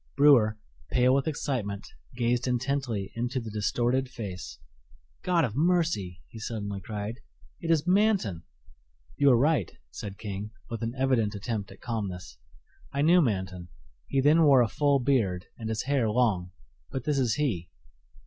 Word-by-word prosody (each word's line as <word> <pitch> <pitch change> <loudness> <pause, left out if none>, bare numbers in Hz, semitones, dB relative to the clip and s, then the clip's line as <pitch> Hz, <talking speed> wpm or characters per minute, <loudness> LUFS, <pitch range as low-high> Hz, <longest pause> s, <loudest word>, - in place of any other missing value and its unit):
Brewer, 120 -7 +6 0.3
pale 125 +1 +4
with 135 +2 +1
excitement, 120 -10 -2 0.3
gazed 120 +1 0
intently 125 -5 -1
into 120 +3 -1
the 115 -3 -7
distorted 120 +5 0
face. 95 - -7 0.6
"God 175 -4 +2
of 115 -3 -5
mercy!" 155 - +1
he 110 - -11
suddenly 105 -3 -4
cried, 105 +3 -5 0.4
"it 165 - -5
is 160 -2 +3
Manton!" 185 - +2 0.7
"You 140 - +4
are 125 - +6
right," 140 - +2 0.2
said 100 - -7
King, 100 0 -5 0.2
with 115 - -4
an 115 +2 -3
evident 125 -6 +1
attempt 105 0 -3
at - - -14
calmness: 95 - -5 0.5
"I 140 +1 0
knew 175 +3 +6
Manton. 95 - -2 0.4
He 135 - +1
then 150 +4 +5
wore 140 -5 +6
a - - +1
full 145 +3 +2
beard 115 -9 +1
and 110 -2 -6
his 110 -1 -1
hair 135 -5 +1
long, 105 -6 +1 0.4
but 130 - -4
this 145 0 +1
is 120 -4 +2
he." 115 - -1
120 Hz, 155 wpm, -28 LUFS, 105-140 Hz, 0.7 s, Brewer